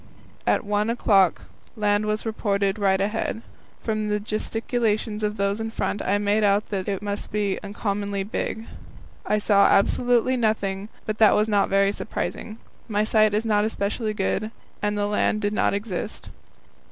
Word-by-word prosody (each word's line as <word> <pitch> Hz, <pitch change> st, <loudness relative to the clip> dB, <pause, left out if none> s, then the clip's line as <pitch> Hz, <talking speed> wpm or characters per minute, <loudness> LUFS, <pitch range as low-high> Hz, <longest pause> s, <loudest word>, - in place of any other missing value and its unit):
At -, -, +2 dB
one 210 Hz, +1 st, 0 dB
o'clock 200 Hz, -6 st, +3 dB, 0.3 s
land 210 Hz, -1 st, +1 dB
was 215 Hz, +1 st, -1 dB
reported 200 Hz, -2 st, 0 dB
right 190 Hz, -1 st, +2 dB
ahead. 215 Hz, +2 st, -2 dB, 0.4 s
From 215 Hz, -1 st, -1 dB
the 210 Hz, 0 st, 0 dB
gesticulations 215 Hz, 0 st, -1 dB
of 210 Hz, 0 st, -1 dB
those 200 Hz, +2 st, 0 dB
in 225 Hz, -, -3 dB
front 210 Hz, -2 st, -2 dB
I 200 Hz, +2 st, +1 dB
made 205 Hz, +1 st, +1 dB
out 205 Hz, +1 st, +3 dB
that 195 Hz, -1 st, -2 dB
it 200 Hz, 0 st, -3 dB
must 205 Hz, 0 st, -4 dB
be 205 Hz, -2 st, 0 dB
uncommonly 200 Hz, -1 st, -2 dB
big. 220 Hz, +2 st, -4 dB, 0.6 s
I 210 Hz, -, +2 dB
saw 205 Hz, -1 st, +4 dB
absolutely 245 Hz, +4 st, +3 dB
nothing, 205 Hz, -3 st, -1 dB, 0.2 s
but 215 Hz, 0 st, -3 dB
that 215 Hz, -2 st, +6 dB
was 210 Hz, +1 st, +2 dB
not 205 Hz, -2 st, +2 dB
very 195 Hz, 0 st, +3 dB
surprising. 215 Hz, +1 st, -5 dB, 0.3 s
My 210 Hz, -2 st, +1 dB
sight 215 Hz, -1 st, +3 dB
is 215 Hz, +2 st, 0 dB
not 210 Hz, -1 st, +2 dB
specially 215 Hz, +1 st, -2 dB
good, 210 Hz, +2 st, -1 dB, 0.3 s
and 205 Hz, 0 st, 0 dB
the 205 Hz, -, +1 dB
land 210 Hz, +1 st, +1 dB
did 205 Hz, 0 st, 0 dB
not 210 Hz, -, +1 dB
exist. 205 Hz, 0 st, -5 dB
210 Hz, 165 wpm, -24 LUFS, 200-215 Hz, 0.6 s, that